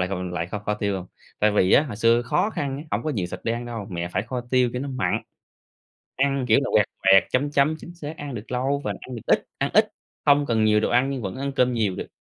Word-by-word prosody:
lại 90 - 0
còn 100 -1 -3
mình 90 - -6
lại 85 0 -2
kho 105 - -4
kho 105 +1 -2
tiêu 100 -2 -1
hông? 90 - -7 0.3
Tại 105 - +4
vì 95 -2 +3
á, 145 - +7
hồi 120 -9 -6
xưa 115 +1 +3
khó 150 - +1
khăn 140 -8 -3
á, 150 - -8
hổng - - -1
có 155 - 0
nhiều 100 -11 -2
thịt - - -6
để 115 - +1
ăn 120 +1 -4
đâu. 115 -4 -5
Mẹ 85 -1 -3
phải - - 0
kho 125 +2 -4
tiêu 125 -1 +3
cho 125 - -3
nó 140 - -4
mặn, 100 -9 -1 0.9
ăn, 135 -1 +1
kiểu 115 - +5
là, - - -2
quẹt 105 -2 +5 0.3
quẹt 95 0 +8
chấm 145 +3 +1
chấm, 145 +2 +3
chính 175 - -10
xác, 155 -1 -7
ăn 145 -3 -6
được 110 +1 -8
lâu 135 +3 0
và - - -1
ăn 130 - -8
được 115 - -7
ít - - +2
ăn - - 0
ít, - - +4 0.3
không 145 0 +5
cần 115 -2 +2
nhiều 105 0 +4
đồ 110 - 0
ăn 125 +3 +3
nhưng 135 -2 -3
vẫn 95 -3 -4
ăn 140 +1 -2
cơm 125 -2 +2
nhiều 105 -5 0
được. - - -5
120 Hz, 290 wpm, -24 LUFS, 105-140 Hz, 0.9 s, quẹt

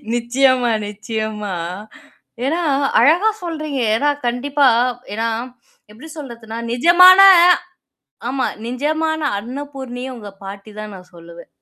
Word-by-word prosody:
நிச்சயமா, 250 0 +1 0.2
நிச்சயமா. 210 -1 -5 0.9
ஏன்னா, 325 +6 -1 0.4
அழகா 335 - +4
சொல்றீங்க. 310 -5 -4 0.2
ஏன்னா, 290 +6 +1 0.2
கண்டிப்பா 275 +3 +1 0.5
ஏன்னா, 225 +2 -2 0.6
எப்படி 225 +9 -13
சொல்றதுனா, 235 -5 -9 0.2
நிஜமான 360 +8 +7 1.1
ஆமா, 265 0 -1 0.2
நிஜமான 315 +5 -2 0.2
அன்னபூர்ணியே 260 +1 -7
உங்க 210 -3 -10
பாட்டி 200 +2 -9
தான்னு 215 -1 -7
நான் 180 -1 -16
சொல்லுவேன். 170 0 -14
250 Hz, 100 wpm, -18 LUFS, 220-290 Hz, 1.1 s, நிஜமான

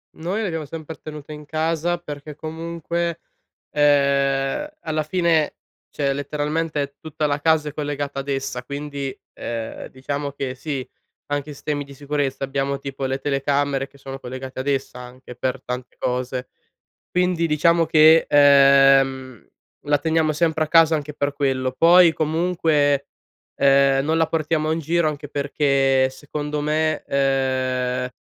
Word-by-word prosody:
Noi 180 +7 -3
l'abbiamo 165 -7 -3
sempre 160 +2 -8
tenuta 150 -1 -9
in 150 0 -9
casa 165 +3 -1
perché 150 -2 -8
comunque, 170 +1 -4 0.5
ehm, 140 - +2
alla 155 -1 -2
fine, 165 -1 +1 0.3
cioè 140 -2 -1
è - - +2
letteralmente, 150 +2 -2
è 140 0 -4
tutta 155 -1 -2
la 145 0 -1
casa 155 0 +2
è - - -11
collegata 145 -2 -3
ad 135 - -6
essa 135 -2 -2
quindi, 140 -1 -5 0.2
ehm, 115 -1 -5
diciamo 140 +2 -4
che, 135 -2 -4
sì, 135 -2 -4 0.4
anche 145 +1 -3
sistemi 145 0 -3
di 140 - -13
sicurezza, 140 -1 -2
abbiamo 140 0 -1
tipo 135 -1 -5
le 135 +1 -2
telecamere 140 0 0
che 140 - -21
sono 135 0 -8
collegate 130 +1 -7
ad 135 - -4
essa 135 -2 -2
anche, 125 0 -11
per 130 +1 -2
tante 125 0 -6
cose. 125 0 -3 0.6
Quindi, 180 -2 +1
diciamo 165 +2 +3
che, 160 +1 +6
uhm, 135 -3 +5 0.4
la 145 -1 +3
teniamo 160 0 +1
sempre 160 0 +1
a 155 - -9
casa 165 -1 +5
anche 150 0 -6
per 145 -1 -1
quello. 135 -3 0
Poi 170 0 +7
comunque, 155 -3 +1 0.5
ehm, 135 0 +4
non 160 +2 +1
la 165 0 +3
portiamo 155 0 0
in 165 - -1
giro 165 +1 +1
anche 145 -1 -6
perché 140 -2 +2
secondo 145 +2 -5
me, 155 +1 0
ehm 130 -2 0
145 Hz, 145 wpm, -22 LUFS, 135-155 Hz, 0.6 s, Poi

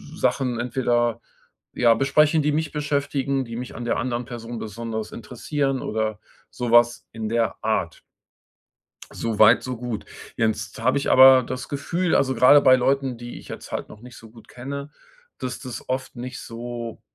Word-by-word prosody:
Sachen 125 -3 0
entweder, 120 -2 0 0.5
ja, 120 -1 +4
besprechen, 150 +5 +3
die 150 +1 +1
mich 155 0 -1
beschäftigen, 140 -2 -1
die 115 - -7
mich 125 +1 -7
an 120 - -6
der 120 - 0
anderen 120 0 -2
Person 120 0 -7
besonders 110 0 -5
interessieren 135 +3 -3
oder 110 -1 -2 0.3
so 120 -2 -4
was 120 0 +4
in 110 -1 -5
der 115 -2 0
Art. - - -1 1.1
So 115 -2 -4
weit, 110 +2 +6
so 130 -1 -4
gut. 120 -2 -5 0.3
Jetzt 110 -1 -1
habe 130 +2 +2
ich 140 - -2
aber 130 -1 +8
das 125 -2 -6
Gefühl, 170 +5 -1
also, 130 -1 +2
grade 130 +5 +7
bei 130 - +6
Leuten, 135 0 0
die 120 +1 -8
ich - - -14
jetzt - - -9
halt - - -4
noch 105 - -13
nicht 125 +1 -13
so 115 - -14
gut 115 0 -17
kenne, 140 +3 -7 0.5
dass 125 -1 -5
das 125 -2 -8
oft 130 0 -3
nicht 125 +1 -6
so, 120 0 -7
125 Hz, 170 wpm, -23 LUFS, 115-135 Hz, 1.1 s, aber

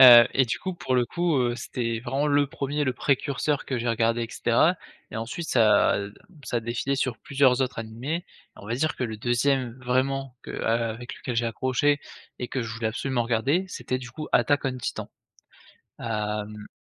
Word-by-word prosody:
heu, 120 -3 +11
et 130 - +4
du - - -1
coup, 185 - -3
pour 130 -7 -2
le 125 -1 +4
coup, 170 +5 0
heu, 120 -1 +1
c'était 115 -2 -3
vraiment 135 +4 -1
le 145 -1 +3
1er, 145 0 -2
le 130 - +1
précurseur 140 +2 0
que 130 - -1
j'ai 120 - -2
regardé 115 +1 +2
et - - -2
cetera - - +3 0.3
et - - -6
ensuite 130 +10 -4
ça, 110 -4 +5
heu, 100 +1 -6 0.3
ça 125 - -2
a 115 - +1
défilé 120 +4 -1
sur 130 -4 -1
plusieurs 135 -3 +3
autres 125 -2 -1
animés, 125 +10 -4 0.3
on 100 - -11
va 115 - -1
dire 155 +5 0
que - - -1
le 110 -2 -4
2e 120 +2 +1
vraiment 130 +1 0
que - - -9
a 115 +1 +1
avec 120 +2 -6
lequel 125 - -5
j'ai 120 - +2
accroché 130 +5 +1 0.4
et 125 - -4
que 130 - -2
je 115 -1 -5
voulais 110 0 -2
absolument 125 +2 -1
regarder 135 +11 +1
c'était, 130 -7 -3
du 125 -2 -9
coup, 155 +4 -6
Attack 145 0 +3
On 130 -1 -1
Titan. - - -4 0.9
Hem, 105 -1 -3
125 Hz, 200 wpm, -26 LUFS, 115-140 Hz, 0.9 s, heu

